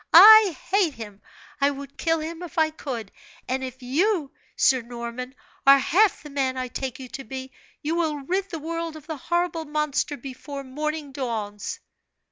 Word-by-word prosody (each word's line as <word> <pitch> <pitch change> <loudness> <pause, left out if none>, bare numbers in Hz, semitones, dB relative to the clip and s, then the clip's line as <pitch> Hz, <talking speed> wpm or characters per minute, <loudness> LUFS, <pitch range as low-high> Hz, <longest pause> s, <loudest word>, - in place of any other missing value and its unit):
I 415 0 +10
hate 375 -7 +3
him! 210 -3 -9 0.4
I 280 - +5
would 280 -1 -7
kill 325 -1 +1
him 325 +2 -6
if 345 -3 -9
I 315 -1 +3
could: 245 -9 -6 0.4
and 260 +1 -1
if 260 0 -7
you, 310 - +1 0.2
Sir 260 -2 +4
Norman, 240 +2 -6 0.3
are 275 0 +10
half 375 +8 +3
the 295 - -10
man 265 -2 0
I 255 -1 -3
take 260 0 -4
you 260 - -8
to 270 - -7
be, 260 +2 -7 0.3
you 305 +2 0
will 330 -3 +1
rid 380 +7 -1
the 330 - -4
world 330 +1 -4
of 310 - -11
the 315 -1 -5
horrible 345 +2 -1
monster 300 -1 -1
before 275 +2 -7
morning 300 +2 -4
dawns!" 220 -6 -4
285 Hz, 175 wpm, -25 LUFS, 260-325 Hz, 0.4 s, I